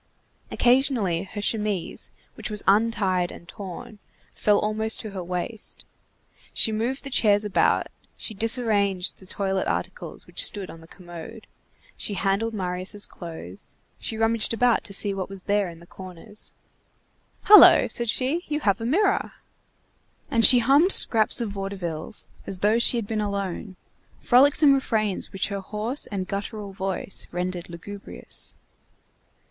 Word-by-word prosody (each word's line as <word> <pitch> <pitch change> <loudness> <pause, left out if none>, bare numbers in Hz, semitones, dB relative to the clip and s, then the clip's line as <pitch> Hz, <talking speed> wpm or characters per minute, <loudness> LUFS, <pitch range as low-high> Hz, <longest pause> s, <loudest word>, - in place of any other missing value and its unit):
Occasionally 240 - +2
her 205 -1 -4
chemise, 210 -5 -1 0.2
which - - -6
was 210 -1 0
untied 195 -4 +2
and 170 - -13
torn, 200 +2 -9 0.3
fell 210 -1 +2
almost 220 +1 0
to 215 - -7
her 190 -2 -5
waist. 180 +5 -4 0.7
She 220 - +5
moved 235 +5 -2
the 275 - -7
chairs 210 -4 +4
about, 205 - +2 0.3
she 220 - -5
disarranged 210 -4 +1
the 190 - -12
toilet 190 0 -2
articles - - -4
which - - +2
stood 200 -3 -1
on 165 - -13
the 165 - -15
commode, 175 +5 -11 0.5
she 205 - -4
handled 200 +4 -1
Marius' 185 +2 -3
clothes, 160 - -10 0.2
she 220 - -4
rummaged 225 0 +1
about 240 0 +2
to 200 - -8
see 200 +1 +3
what 190 -1 -4 0.2
there 205 0 +1
was - - -7
in 165 - -14
the 170 - -15
corners. 185 +4 -10 0.9
"Hullo!" 420 0 +9
said 235 -1 -3
she, 270 +9 +2
"you 300 0 -2
have 200 -2 +1
a - - -3
mirror!" 390 - +1 1.0
And 230 - +2
she 250 - +8
hummed 280 +10 +4
scraps 220 +1 +3
of 225 -3 -3
vaudevilles, 195 -4 -3 0.2
as 195 - -2
though 215 +3 +3
she 240 +1 +3
had 230 - -2
been 215 +1 -2
alone, 200 -1 -4 0.4
frolicsome 280 +3 +5
refrains 220 -7 -1
which 195 - -2
her 200 -1 -3
hoarse 215 +7 -3
and 195 -4 -4
guttural 200 0 -5
voice 190 0 -2
rendered 180 0 -4
lugubrious. 195 +4 -9
205 Hz, 145 wpm, -24 LUFS, 190-230 Hz, 1.0 s, Hullo